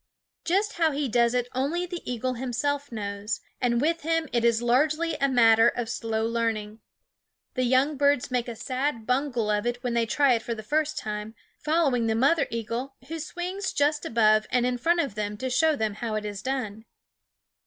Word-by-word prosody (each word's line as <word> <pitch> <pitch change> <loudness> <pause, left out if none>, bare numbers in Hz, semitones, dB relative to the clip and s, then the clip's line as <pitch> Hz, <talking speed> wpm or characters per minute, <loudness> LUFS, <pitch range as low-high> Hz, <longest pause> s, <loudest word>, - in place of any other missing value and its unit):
Just 395 +5 +1
how 325 -2 +4
he 285 0 -1
does 235 +1 +2
it 245 -1 0
only 290 +8 -1
the 350 -1 -6
eagle 255 +1 -2
himself 265 +3 -2
knows; 205 -1 -3 0.2
and 235 -1 +2
with 330 +5 +1
him 330 +1 0
it 235 -1 +1
is 235 -1 +3
largely 300 +8 +2
a 275 - +1
matter 230 -2 +6
of 240 -2 -4
slow 225 -2 -2
learning. 225 -2 -2 0.7
The 255 -1 0
young 265 +4 +2
birds 285 -2 +2
make 250 -1 0
a 235 - -5
sad 255 -1 -2
bungle 250 -4 0
of 210 +2 0
it 240 +1 -3
when 245 -2 -1
they 230 -1 +1
try 280 +3 +3
it 230 - 0
for 235 +1 -4
the 220 - -8
first 305 +5 0
time, 210 +1 -5 0.2
following 295 -7 +1
the 220 - +1
mother 280 +6 +3
eagle, 230 +4 -4
who 325 0 -4
swings 360 +5 -4
just 295 +1 +1
above 215 -2 +3
and 245 -1 +2
in 250 0 -1
front 340 +6 +2
of 275 -9 -3
them 210 0 -3
to 260 +3 -3
show 315 +4 +3
them 220 -5 -1
how 215 +1 -4
it 215 0 -3
is 205 -1 -5
done. 225 -5 -3
245 Hz, 195 wpm, -26 LUFS, 225-290 Hz, 0.7 s, matter